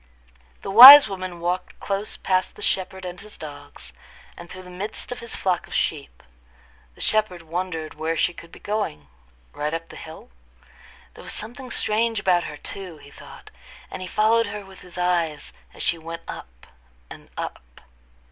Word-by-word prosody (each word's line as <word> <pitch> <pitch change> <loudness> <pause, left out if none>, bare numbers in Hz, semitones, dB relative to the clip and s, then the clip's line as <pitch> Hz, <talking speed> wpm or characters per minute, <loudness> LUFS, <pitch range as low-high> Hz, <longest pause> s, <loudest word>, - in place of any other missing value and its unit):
The 195 - -4
wise 265 +6 +12
woman 185 -3 -6
walked 180 +2 -3
close 200 +1 -3
past 185 -1 -1
the - - -6
shepherd 190 0 -1
and 180 0 -7
his 210 0 -10
dogs, 145 -2 -10 0.4
and 175 0 -12
through 185 0 -9
the 180 - -12
midst 200 +7 -4
of 245 - -5
his 235 -1 -6
flock 180 -2 -1
of - - -8
sheep. 145 -3 -3 0.7
The - - -12
shepherd 210 -6 0
wondered 165 -1 -4
where 160 +1 -3
she 175 - +1
could 170 -1 -13
be - - -13
going—right 70 - -6
up 165 0 -7
the - - -12
hill. 160 - -11 0.8
There - - -13
was - - -5
something 245 +4 -8
strange 225 0 0
about 180 -3 +2
her 150 - -7
too, 185 -2 -6
he 140 -1 -16
thought; - - -14 0.4
and - - -7
he 185 - -5
followed 225 +3 +2
her 205 0 -7
with 190 -1 -15
his 180 0 -14
eyes 170 -4 -1 0.2
as - - -7
she 170 - 0
went 165 +1 -8
up - - -10 0.5
and - - -12
up. - - -8
180 Hz, 175 wpm, -23 LUFS, 160-200 Hz, 0.8 s, wise